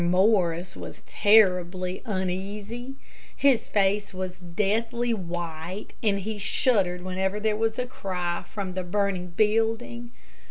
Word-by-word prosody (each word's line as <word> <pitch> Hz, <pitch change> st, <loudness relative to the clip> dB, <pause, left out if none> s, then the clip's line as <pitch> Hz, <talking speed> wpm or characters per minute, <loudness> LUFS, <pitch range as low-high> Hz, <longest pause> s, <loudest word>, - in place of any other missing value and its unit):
Morris 180 Hz, -2 st, +2 dB
was -, -, -8 dB
terribly 185 Hz, -3 st, +3 dB
uneasy. 205 Hz, +5 st, -3 dB, 0.4 s
His 275 Hz, -4 st, +3 dB
face 200 Hz, 0 st, +1 dB
was 185 Hz, 0 st, -4 dB
deathly 225 Hz, +7 st, 0 dB
white, 175 Hz, -1 st, -5 dB
and 205 Hz, -3 st, +2 dB
he 215 Hz, +2 st, -4 dB
shuddered 190 Hz, -4 st, +2 dB
whenever 190 Hz, +2 st, -1 dB
there 215 Hz, 0 st, +1 dB
was 225 Hz, +1 st, 0 dB
a 250 Hz, -, 0 dB
cry 180 Hz, -7 st, -3 dB
from 195 Hz, -3 st, -4 dB
the 185 Hz, -, -2 dB
burning 185 Hz, 0 st, 0 dB
building. 225 Hz, +5 st, 0 dB
195 Hz, 120 wpm, -26 LUFS, 180-220 Hz, 0.4 s, terribly